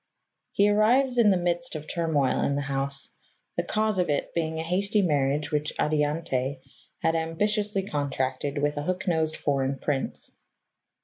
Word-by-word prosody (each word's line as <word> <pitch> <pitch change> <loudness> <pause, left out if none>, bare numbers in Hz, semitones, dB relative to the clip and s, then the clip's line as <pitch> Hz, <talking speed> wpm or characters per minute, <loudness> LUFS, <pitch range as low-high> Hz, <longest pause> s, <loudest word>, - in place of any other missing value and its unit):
He 200 - +3
arrives 245 +5 +3
in 220 -3 +6
the 190 - +4
midst 175 -1 -1
of 155 -1 -5
turmoil 155 -6 +1
in 140 - +1
the 145 - -1
house, 135 0 +1 0.5
the - - +1
cause 215 -2 0
of 180 - +1
it 145 - -1
being 160 -1 -1
a 160 - -2
hasty 200 +5 +1
marriage 145 -2 +1
which 150 0 0
Adiante 150 -3 0 0.4
had 165 - +3
ambitiously 205 +5 0
contracted 140 -1 -2
with 145 +1 0
a - - -1
hook 185 +5 -3
nosed 160 -2 +1
foreign 135 -1 0
prince. 135 0 -3
160 Hz, 160 wpm, -27 LUFS, 145-185 Hz, 0.5 s, in